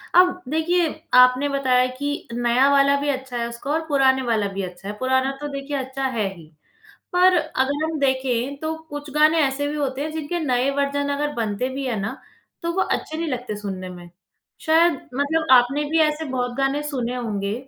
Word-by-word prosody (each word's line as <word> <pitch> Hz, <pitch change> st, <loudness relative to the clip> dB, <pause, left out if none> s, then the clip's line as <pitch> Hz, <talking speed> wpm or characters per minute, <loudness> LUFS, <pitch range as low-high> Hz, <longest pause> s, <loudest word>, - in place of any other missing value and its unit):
अब 360 Hz, 0 st, +5 dB
देखिए, 335 Hz, +3 st, +1 dB, 0.3 s
आपने 250 Hz, +3 st, +6 dB
बताया 255 Hz, -2 st, +2 dB
कि 285 Hz, +1 st, -3 dB
नया 240 Hz, +3 st, +3 dB
वाला 280 Hz, 0 st, +4 dB
भी 290 Hz, -, -1 dB
अच्छा 260 Hz, -2 st, -3 dB
है 235 Hz, 0 st, -1 dB
उसका 235 Hz, +5 st, -6 dB
और 320 Hz, +1 st, +1 dB
पुराने 265 Hz, -2 st, +3 dB
वाला 225 Hz, -5 st, 0 dB
भी 195 Hz, -, -3 dB
अच्छा 180 Hz, +2 st, -8 dB
है। 205 Hz, -, -3 dB
पुराना 260 Hz, +1 st, +1 dB
तो 295 Hz, -, -3 dB
देखिए 275 Hz, +1 st, -4 dB
अच्छा 265 Hz, +1 st, -4 dB
है 215 Hz, -4 st, 0 dB
ही, 165 Hz, -2 st, -13 dB, 0.7 s
पर 365 Hz, 0 st, +5 dB
अगर 285 Hz, +2 st, -1 dB
हम 320 Hz, -1 st, -2 dB
देखें 265 Hz, 0 st, 0 dB
तो 315 Hz, 0 st, -2 dB, 0.2 s
कुछ 290 Hz, 0 st, -7 dB
गानें 310 Hz, +2 st, +5 dB
ऐसे 285 Hz, 0 st, +1 dB
भी 295 Hz, -, -3 dB
होते 275 Hz, -2 st, -2 dB
हैं 310 Hz, +1 st, -3 dB
जिनके 320 Hz, +2 st, -3 dB
नए 255 Hz, +1 st, +1 dB
वर्ज़न 285 Hz, 0 st, 0 dB
अगर 295 Hz, +1 st, -2 dB
बनते 230 Hz, +2 st, -2 dB
भी 275 Hz, -1 st, -3 dB
हैं 230 Hz, -4 st, -1 dB
ना, 225 Hz, +7 st, -4 dB, 0.4 s
तो 340 Hz, 0 st, -1 dB
वो 380 Hz, -, +1 dB
अच्छे 315 Hz, -, -2 dB
नहीं 330 Hz, 0 st, -2 dB
लगते 245 Hz, -4 st, -4 dB
सुनने 190 Hz, -3 st, -6 dB
में। 175 Hz, -1 st, -11 dB, 0.6 s
शायद 325 Hz, +1 st, +5 dB, 0.2 s
मतलब 305 Hz, +4 st, 0 dB
आपने 260 Hz, +4 st, +5 dB
भी 325 Hz, +1 st, +2 dB
ऐसे 305 Hz, +1 st, -4 dB
बहुत 245 Hz, -1 st, -2 dB
गानें 275 Hz, +2 st, +1 dB
सुने 250 Hz, -3 st, -2 dB
होंगे। 205 Hz, -4 st, -2 dB
270 Hz, 195 wpm, -22 LUFS, 245-295 Hz, 0.7 s, आपने